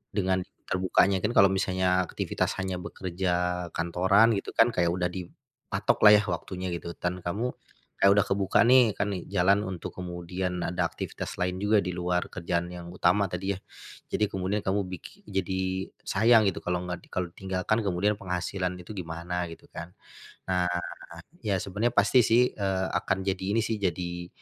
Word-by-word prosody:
dengan 95 -2 +1
di - - -34 0.2
terbukanya, 95 +1 +3
kan 105 - +1
kalau 100 -1 +7
misalnya 95 -1 +1
aktivitas - - -2
hanya 95 -1 -2
bekerja 90 -1 -2
kantoran 95 +7 +4
gitu - - -5
kan 115 +1 +6
kayak 85 -3 +2
udah 90 -1 0
dipatok 90 -1 -3
lah 105 - +11
ya, 105 - +1
waktunya 90 +1 -4
gitu. 85 0 -5
Dan 90 +1 -2
kamu 110 +8 -1 0.5
kayak 100 - +6
udah 100 - +5
kebuka 100 -1 +1
nih 120 -4 +5
kan 100 0 0
nih 90 - -4
jalan 100 +1 +3
untuk 90 -3 -6
kemudian 90 0 -3
ada 90 0 0
aktivitas - - -6
lain 90 +1 -1
juga 105 +1 +4
di 90 - -3
luar 90 0 -1
kerjaan 85 +1 -2
yang 85 -1 -8
utama 95 +3 +3
tadi 95 +2 -2
ya. 95 - -10 0.5
Jadi 105 - +2
kemudian 95 +2 -2
kamu 100 +1 +1
biki 90 +2 -10
jadi 95 -1 -2 0.2
sayang 110 +1 +5
gitu, 95 - -5
kalau 90 0 0
enggak 90 -1 -4
di - - -19
kalau 90 -1 -1
ditinggalkan 95 +4 -1
kemudian 100 +3 +1
penghasilan 90 0 -2
itu 90 - -9
gimana 85 +1 -3
gitu - - -12
kan. 85 - -7 0.6
Nah, 90 -1 +2 0.7
ya 105 -4 0
sebenarnya 105 +5 -1
pasti 105 +5 +5
sih, 120 +2 +4
eee, 95 -2 -1
akan 95 0 0
jadi 95 -1 -1
ini 115 - +3
sih, 110 -1 -2
jadi 85 -1 -2
95 Hz, 170 wpm, -27 LUFS, 90-100 Hz, 0.7 s, lah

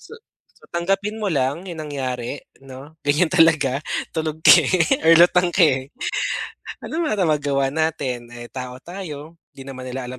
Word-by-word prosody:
so 455 - -13 0.4
so, - - -20
tanggapin 195 +5 -1
mo 210 -2 -2
lang 140 +5 -1
yung 165 -2 -6
nangyari 130 -2 -4 0.2
'no, 135 +3 -11
ganyan 150 +4 +2
talaga 155 -6 +3 0.3
tulog 155 -1 -3
ka, - - +10
eh, 170 -4 +1
or 165 - +8
lutang 180 +1 +5
ka, 190 - 0
eh. 130 -2 +1 0.9
Ano 320 - -5
naman 310 -9 0
magagawa 140 -4 +1
natin, 145 -6 -2
eh, 120 0 -10
tao 125 -1 -7
tayo, 165 -3 -8 0.2
di 135 - -10
naman 130 -1 -9
nila 130 0 -5
alam 130 - -8
150 Hz, 165 wpm, -21 LUFS, 130-170 Hz, 0.9 s, ka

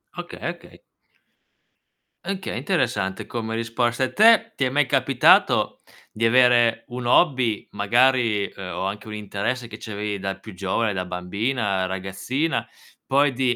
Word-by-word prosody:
Okay, - - -8
okay. - - -7 1.5
Okay, 195 -1 -4
interessante 115 - -1
come 115 -1 -4
risposta. 120 +2 -1
Te, 225 +1 +5
ti 135 - 0
è - - +1
mai 145 +2 +2
capitato 130 -1 +3 0.3
di 115 +2 -1
avere 120 -1 +4
un 125 0 -6
hobby 125 - +2
magari, 115 0 +2
uhm, - - -10
o 85 - -5
anche 105 +2 -5
un 110 - -7
interesse 105 +4 -3
che 110 - -9
c'avevi 105 -1 -4
da 95 0 -4
più 110 - -12
giovane, 100 +4 -1
da 90 -1 -3
bambina, 95 +3 -2
ragazzina, 95 - -2 0.4
poi 140 +1 +3
di 130 -1 0
115 Hz, 135 wpm, -23 LUFS, 100-130 Hz, 1.5 s, Te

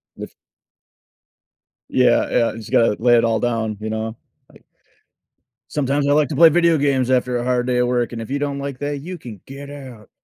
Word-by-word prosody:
Yes. - - -9 1.6
Yeah, - - +3
yeah, 115 -2 +1
you - - -10
just 110 - -11
gotta 115 -2 +3
lay 120 +1 +4
it 115 - +3
all 115 -1 +1
down, 115 -3 -1
you 110 - -4
know? 110 +1 -4 0.4
Like - - -20 1.1
"sometimes 140 0 0
I 145 - +3
like 150 -2 +2
to 150 - -4
play 165 +3 +7
video 170 0 +3
games 135 -3 +1
after 125 -1 +1
a 120 - -3
hard 125 0 0
day 125 -1 +1
at 125 - +2
work, 120 -1 0
and 115 - -6
if 115 - -10
you 140 - -1
don't 140 -1 -2
like 140 -2 -6
that, 145 -1 -3
you 180 +3 -7
can 115 -8 -10
get 140 +1 -10
out." 130 -7 -11
125 Hz, 210 wpm, -20 LUFS, 115-145 Hz, 1.6 s, play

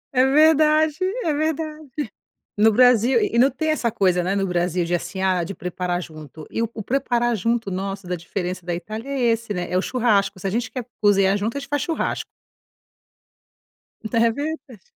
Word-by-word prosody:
É 255 - +5
verdade, 310 +1 +4 0.3
é 315 - +1
verdade. 310 0 -2 0.7
No 220 +2 +5
Brasil, 245 - +5
e 415 -2 0
e - - +4
não 260 +3 +6
tem 315 +4 -2
essa 290 -6 +1
coisa, 185 -3 +2
né, 185 +3 -1
no 195 -1 +1
Brasil 175 -1 0
de, 170 - -3
assim, 175 +2 -3
ah, 185 -2 +1
de 190 +4 -6
preparar 180 0 -3
junto. 155 -1 -11
E - - -2
o 230 - +1 0.2
preparar 240 -1 0
junto 230 0 -1
nosso, 195 +1 -4
da 180 - -3
diferença 180 +1 -4
da 175 0 -2
Itália, 215 +8 -7
é 280 -1 -2
esse, 230 -3 0
né, 175 -1 -4
é - - -1
o 185 - +3
churrasco. 210 -5 +1
Se 185 - -10
a 195 - 0
gente 230 +2 -1
quer 255 -3 -5 0.2
cozinhar 195 -2 +4
junto, 215 +6 -2
a - - -1
gente 280 - -9
faz 290 -1 0
churrasco. 330 - -2 1.8
Então, 225 +1 -1
é 230 - +4
verdade. 285 - -6
220 Hz, 195 wpm, -22 LUFS, 185-270 Hz, 1.8 s, não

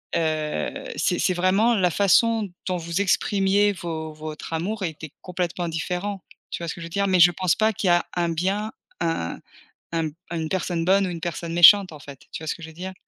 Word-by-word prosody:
heu, 155 - -2
c'est - - 0
c'est 185 - +2
vraiment 195 +6 +3
la 185 -4 +2
façon 205 +3 +3 0.2
dont 185 - 0
vous 170 +2 -2
exprimiez 200 +1 +2
vo 160 -3 -5
votre 155 +1 -8
amour 195 +6 -2
était 155 -3 -5
complètement 175 -1 -3
différent. 180 +4 -3 0.3
Tu - - -4
vois 170 - -4
ce - - -4
que 170 - -10
je - - -6
veux - - -8
dire? 200 +4 0
Mais 185 -1 +3
je 175 +1 +8
pense 175 -1 +1
pas 220 0 +2
qu'il 190 - -2
y - - +5
a 175 0 +3
un 175 -1 0
bien, 195 +6 -1 0.3
un 165 - -2 0.5
un 165 -1 0 0.2
une 160 -2 -2
personne 175 -2 -1
bonne 195 +2 +3
ou - - -3
une 170 -1 -6
personne 170 0 -4
méchante, 180 +2 +7
en 150 - -10
fait. 140 -1 -12
Tu - - -6
vois - - -7
ce - - -1
que 165 - -14
je 160 - -7
veux - - -11
dire? 185 +2 -7
175 Hz, 225 wpm, -24 LUFS, 165-195 Hz, 0.5 s, je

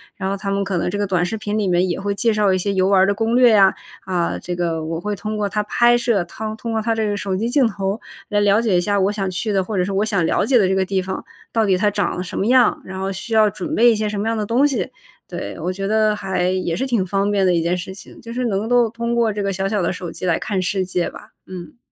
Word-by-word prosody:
然 190 -1 -3
后 195 - -2
他 200 0 -4
们 200 0 0
可 195 -2 -2
能 170 - -1
这 200 - -3
个 205 - 0
短 185 -3 +1
视 200 - -3
频 210 0 -3
里 210 -2 0
面 180 0 +2
也 170 - -2
会 200 +1 -2
介 230 +3 +2
绍 210 -2 +2
一 - - +2
些 200 +2 -1
游 190 -1 +2
玩 195 -1 +4
儿 190 - +4
的 200 - +2
攻 225 +3 0
略 245 -1 +6
呀。 195 -3 +5 0.3
啊， 175 -2 -1
这 175 - -5
个 165 -2 -2
我 165 +1 -4
会 210 +1 -2
通 215 +2 -4
过 210 -1 -1
他 210 - -1
拍 240 +3 +3
摄 235 -6 +1
他 215 +5 -6
通 230 +1 -5
过 220 -1 0
他 225 +1 0
这 220 -1 0
个 205 - -1
手 195 -2 -2
机 220 +5 -1
镜 260 -1 +3
头 200 0 -3 0.3
来 205 - +1
了 205 +1 +3
解 215 -6 +2
一 - - +2
下 205 +3 0
我 195 +2 +2
想 195 -2 -2
去 185 +4 -2
的， 195 -1 +2
或 215 - -4
者 180 - +2
是 195 - -3
我 195 +2 +1
想 200 -6 0
了 - - +1
解 260 - +4
的 210 - +4
这 - - +2
个 190 0 +1
地 190 0 0
方， 190 +1 -5 0.3
到 225 -1 +2
底 195 -2 +3
它 205 +2 +2
长 - - -1
得 180 - -3
什 185 - -5
么 - - 0
样， 250 +1 +4
然 190 0 -6
后 195 0 -2
需 195 +4 -5
要 215 -1 +5
准 305 +9 -5
备 240 +1 +6
一 - - +2
些 215 0 -1
什 210 0 -3
么 220 - -1
样 225 - -1
的 210 - -1
东 240 +6 +2
西。 280 -3 -1 0.4
对， - - -6
我 175 +3 -2
觉 195 +1 -4
得 215 0 +2
还 190 -3 -2
也 185 -2 -1
是 265 +11 -2
挺 230 -7 +1
方 195 +2 0
便 200 -2 +2
的 180 - +3
一 170 - +2
件 170 +2 0
事 180 +1 -6
情， 195 +2 -14
就 230 - -9
是 250 +1 -2
能够 230 +3 +2
通 235 +1 -3
过 230 -2 +2
这 205 0 -3
个 200 - 0
小 195 +1 -2
小 205 0 0
的 - - 0
手 180 -2 -6
机 185 - -7
来 175 -3 +1
看 195 -3 -2
世 185 +1 -1
界 180 -1 -1
吧， - - -13 0.2
嗯。 180 +2 -9
200 Hz, 335 characters per minute, -20 LUFS, 185-220 Hz, 0.4 s, 略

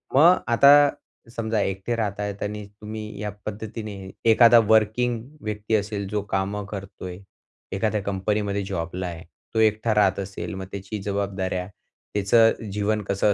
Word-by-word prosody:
मग 170 +6 +7
आता 140 +4 +7 0.5
समजा 110 -1 -1
एकटे 95 +5 -2
राहताय 105 -2 -2
आणि 105 0 -4 0.2
तुम्ही 110 0 -6 0.2
या 105 - -2 0.2
पद्धतीने 110 0 -6 0.4
एखादा 115 +1 +7
वर्किंग 110 +2 +3 0.2
व्यक्ती 105 +1 -1
असेल 100 -1 -2
जो 105 -1 -1
कामं 100 +1 -1
करतोय. 95 -2 -7 0.5
एखाद्या 105 +1 0
कंपनीमध्ये 100 +1 -1
जॉबला 90 0 -3
आहे. 85 0 -7 0.3
तो 110 - +1
एकटा 110 +1 +3
राहत 100 -2 +3
असेल. 100 +1 -5
मग 95 0 -5
त्याची 100 +1 -5
जबाबदाऱ्या, 95 -2 -2 0.5
त्याचं 110 +2 +3
जीवन 105 +1 0
कसं 100 +1 +1
105 Hz, 135 wpm, -24 LUFS, 100-110 Hz, 0.5 s, मग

